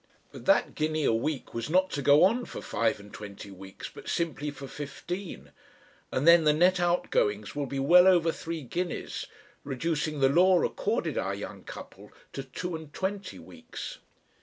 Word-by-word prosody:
But - - -11
that - - +4
guinea 155 0 -1
a - - +3
week 135 +5 -2
was 115 +3 -3
not 185 +3 +3
to 145 - -2
go 145 +3 +6
on 235 +6 +3
for - - -7
five 115 -2 0
and 100 0 -14
twenty 100 -1 -9
weeks, 95 0 -9
but - - -10
simply 150 -3 -1
for 140 -1 -8
fifteen, 155 +7 -7 0.6
and 135 +5 0
then 170 -1 +8
the 150 -1 +5
net 180 +4 +4
outgoings 105 -12 0
will 145 -1 -2
be 140 - -4
well 175 +7 +6
over 170 -3 +5
three 165 -1 -5
guineas, 175 +7 -4 0.4
reducing 150 +2 -2
the 135 - +5
"law" 180 +5 +5
accorded - - -1
our - - -2
young - - -8
couple - - -11 0.2
to 135 - -4
two 170 +6 -5
and 160 -2 -9
twenty 195 0 -3
weeks. 85 -3 -9
155 Hz, 175 wpm, -28 LUFS, 135-175 Hz, 0.6 s, then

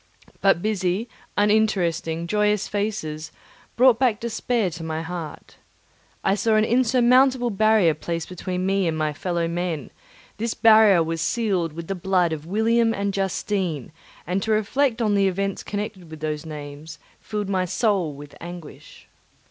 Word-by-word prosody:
But 195 -3 +3
busy, 200 0 0 0.3
uninteresting, 190 -6 +1
joyous 210 +2 +1
faces 200 -7 -3 0.4
brought 245 -1 +5
back 245 -5 +2
despair 235 -3 -1
to 165 +1 -8
my 160 0 -3
heart. 165 -2 -7 0.7
I - - +3
saw 215 +2 +1
an 215 0 +4
insurmountable 250 +1 +3
barrier 210 -4 +4
placed 165 +2 -4
between 180 0 -4
me 195 -1 +1
and 160 -1 -1
my 155 -1 -1
fellow 170 +2 -2
men; 170 -4 -3 0.5
this 230 +2 -2
barrier 215 -6 +6
was 165 0 -3
sealed 185 -5 0
with 165 +1 -7
the 195 - -3
blood 180 -2 +1
of 155 0 -7
William 225 +3 +2
and 200 0 -2
Justine, 190 - -2 0.3
and 185 +3 -1
to 220 - -4
reflect 230 +3 +1
on 210 -2 +2
the 200 -1 +3
events 195 +1 -2
connected 205 -4 -5
with 160 -1 -9
those 155 0 -4
names 150 0 -8 0.2
filled 210 -2 -4
my 190 -2 0
soul 185 -3 0
with 145 +1 -11
anguish. 175 -2 -11
195 Hz, 150 wpm, -23 LUFS, 165-215 Hz, 0.7 s, barrier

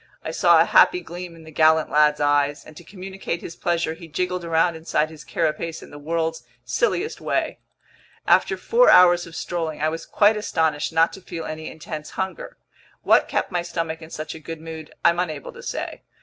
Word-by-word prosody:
I - - -4
saw - - +5
a - - +5
happy 360 - +5
gleam 175 - -8
in 165 - -14
the 160 - -12
gallant 160 0 +3
lad's 150 0 +4
eyes, 145 0 +1
and 155 - -14
to 175 - -12
communicate 190 -1 -6
his 165 - -7
pleasure, 170 -2 -1
he 165 +1 -11
jiggled 180 +3 -2
around 165 0 +2
inside 160 -1 -1
his 155 -2 -12
carapace 165 +2 -2
in - - -13
the 145 - -10
world's 160 +1 -2 0.2
silliest 445 -3 -1
way. - - -1 0.7
After - - +3
four - - +4
hours 175 -1 +6
of 165 - -12
strolling, 165 -3 -3
I 155 +1 +1
was 165 +1 -6
quite 210 +1 +4
astonished 160 -8 0
not 165 +1 +3
to 190 - -10
feel 170 -3 -7
any 155 0 -6
intense 155 -1 -7
hunger. 190 0 -4 0.5
What - - +4
kept - - -1
my 175 -1 0
stomach 165 -2 -4
in 160 - -10
such 155 -1 -6
a 160 - -9
good 165 +1 -7
mood 160 -1 -9
I'm 170 +1 +4
unable 155 -5 -3
to - - -11
say. - - -5
165 Hz, 200 wpm, -23 LUFS, 155-175 Hz, 0.7 s, hours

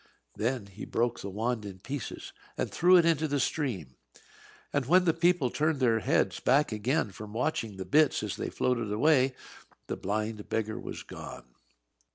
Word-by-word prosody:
Then 120 0 -1
he 100 +1 -10
broke 120 0 -1
the 100 - -5
wand 110 +3 -2
in 100 -2 -8
pieces, 135 +8 -6 0.2
and - - -2
threw 180 +2 +6
it 170 - +5
into 160 -2 +2
the 145 -1 0
stream. 110 - -2 0.8
And 140 -4 0
when 180 +4 +5
the 165 - +4
people 170 -6 +2
turned 155 -1 0
their 115 -4 +3
heads 105 - +1
back 140 +2 +3
again 110 +3 0
from 105 +2 -9
watching 115 -4 -2
the 95 - -5
bits 150 -1 +3
as - - -3
they - - -4
floated 120 -4 -1
away, 130 +3 +3 0.5
the - - -3
blind 105 +1 -3
beggar 110 -1 -2
was - - -7
gone. 60 - -10
125 Hz, 175 wpm, -29 LUFS, 105-150 Hz, 0.8 s, threw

